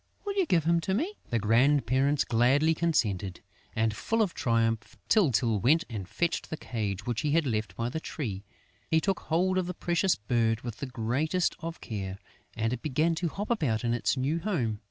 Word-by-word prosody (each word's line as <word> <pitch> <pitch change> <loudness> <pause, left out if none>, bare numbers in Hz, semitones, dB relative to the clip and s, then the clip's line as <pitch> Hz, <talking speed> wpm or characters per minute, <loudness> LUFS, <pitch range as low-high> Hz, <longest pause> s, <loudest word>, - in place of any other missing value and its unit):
Will 405 - -1
you 390 -3 +1
give 170 -3 +3
him 170 +2 +3
to 190 +2 -1
me?" 335 - -1 0.2
The 120 - +1
grandparents 130 +5 +3
gladly 135 +7 +3
consented; 105 - 0 0.3
and, 110 -1 +1
full 225 - +1
of 190 - -2
triumph, 115 -2 0
Tyltyl 120 - +3
went 150 - +4
and 100 -5 -5
fetched 170 -1 -1
the 160 - -4
cage 105 -7 -3
which 120 -2 -1
he 145 -1 0
had 165 -1 +3
left 110 -6 -2
by 115 +4 -2
the 140 +6 -3
tree. 110 -12 -5 0.5
He 160 - +4
took 195 +2 0
hold 185 +4 +1
of 180 - -2
the 180 - -4
precious 175 +1 +1
bird 115 +1 0
with 120 -3 -6
the 140 - -5
greatest 130 +9 0
of 165 0 -6
care; 95 -4 -5 0.4
and 115 +1 0
it 125 - -4
began 155 +3 +1
to 170 +1 -1
hop 205 +8 -4
about 130 - 0
in 120 -1 +1
its 120 +3 0
new 140 +6 0
home. 135 - -1
130 Hz, 195 wpm, -29 LUFS, 115-165 Hz, 0.5 s, went